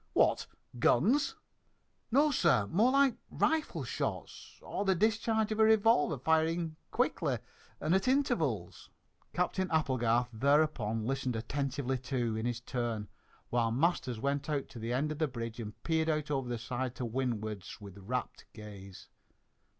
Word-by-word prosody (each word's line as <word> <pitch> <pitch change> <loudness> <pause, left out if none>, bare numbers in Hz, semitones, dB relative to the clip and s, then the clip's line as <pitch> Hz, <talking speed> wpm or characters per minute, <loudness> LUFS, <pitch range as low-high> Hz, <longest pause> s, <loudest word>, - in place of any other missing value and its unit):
"What, - - +3 0.3
guns?" 225 - +3 0.7
"No 285 +5 +4
sir, 170 - +3
more 215 +9 +4
like 275 -2 +4
rifle 315 0 0
shots, - - -5
or - - -3
the 190 -2 +3
discharge 220 +2 +1
of 215 - -2
a - - +7
revolver 220 - +4
firing 160 +3 +1
quickly - - 0 0.4
at 190 +8 +1
intervals." 165 - 0 0.4
Captain 185 +1 0
Applegarth 125 -6 +1
thereupon 125 -4 +2
listened 130 -1 -1
attentively, 130 +2 -2
too, 120 -3 -1
in 110 +2 -1
his 120 0 -3
turn, 120 -4 -3 0.4
while 120 -1 +2
Masters 130 -3 0
went 140 +3 -1
out 145 -3 -1
to 120 - -9
the 115 +2 -3
end 140 +5 0
of 155 - -5
the 155 - +2
bridge 115 -3 -6
and 110 -2 -8
peered 160 -1 +1
out 150 -1 -1
over 135 -3 -1
the 120 - -2
side 125 +2 -3
to 125 - -3
windward 110 -5 -2 0.2
with 100 -2 -11
rapt 125 +6 -4
gaze. 100 -3 -11
135 Hz, 145 wpm, -32 LUFS, 115-170 Hz, 0.7 s, a